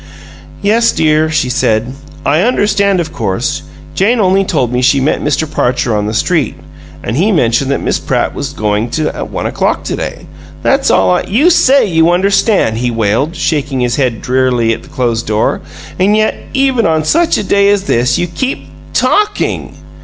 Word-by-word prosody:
"Yes, 230 +3 +3
dear," 155 0 +1
she 155 -4 0
said. 120 -1 0 0.3
"I 150 +4 +2
understand, 205 -4 +1
of 160 -2 -4
course. 105 - -2 0.3
Jane 225 +5 +1
only 195 -1 +3
told 130 -10 -1
me 125 - 0
she 135 +2 +3
met 135 +3 0
Mr. 150 +1 0
Parcher 125 -5 -1
on 105 0 -1
the 110 - -3
street, 160 - 0 0.5
and 110 - -3
he 190 +10 +2
mentioned 135 - +1
that 140 - -1
Miss - - 0
Pratt - - -1
was 140 - -4
going 110 -3 -1 0.2
at - - -6
one - - -4
o'clock - - -1
to - - -3
day. - - -6 0.4
That's - - +2
all 95 -1 +3
I - - +2
" - - -12
"You 290 - +3
say 275 -4 +4
you 165 -3 +2
understand," 190 - +2
he 125 0 0
wailed, 115 - -1
shaking 145 -4 -1
his 120 -1 0
head 125 -6 -1
drearily 125 -3 +1
at - - -6
the - - -16
closed 120 -3 -2
door, 105 0 0 0.4
"and 205 +3 +3
yet, 215 0 +1 0.2
even 265 -4 +2
on 160 -1 +1
such 335 - +2
a - - -2
day 200 +1 +2
as 205 -1 +1
this, 125 -5 +1
you 175 - 0
keep 260 +10 -4 0.2
TALKING! 420 0 0
155 Hz, 185 wpm, -13 LUFS, 120-200 Hz, 0.5 s, say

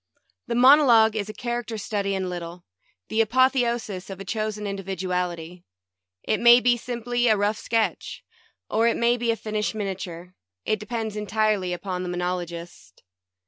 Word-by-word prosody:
The - - -2
monologue 245 -4 +6
is 210 -1 -3
a - - -3
character 240 +1 -4
study 200 -1 -2
in 190 -1 -2
lit 180 -1 -4
tle; 170 +1 -10 0.4
the 220 - +2
apotheosis 235 -5 +1
of 195 -1 -7
a 195 - -7
chosen 215 +1 -3
individuality. 180 -3 -4 0.6
It 215 - 0
may 240 +1 +8
be 245 -1 +3
simply 240 0 -2
a 215 -2 +4
rough 205 +2 0
sketch, 225 -1 -2 0.4
or 225 +2 +2
it 230 - +1
may 235 +1 +3
be 240 -1 -2
a 230 - +3
finished 215 -1 -3
miniature 185 -4 -5 0.2
— 90 +1 -62
it 215 - 0
depends 220 0 -4
entirely 210 -3 0
upon 180 +1 -4
the 180 - -4
monologist. 175 -1 -5
210 Hz, 160 wpm, -24 LUFS, 185-235 Hz, 0.6 s, may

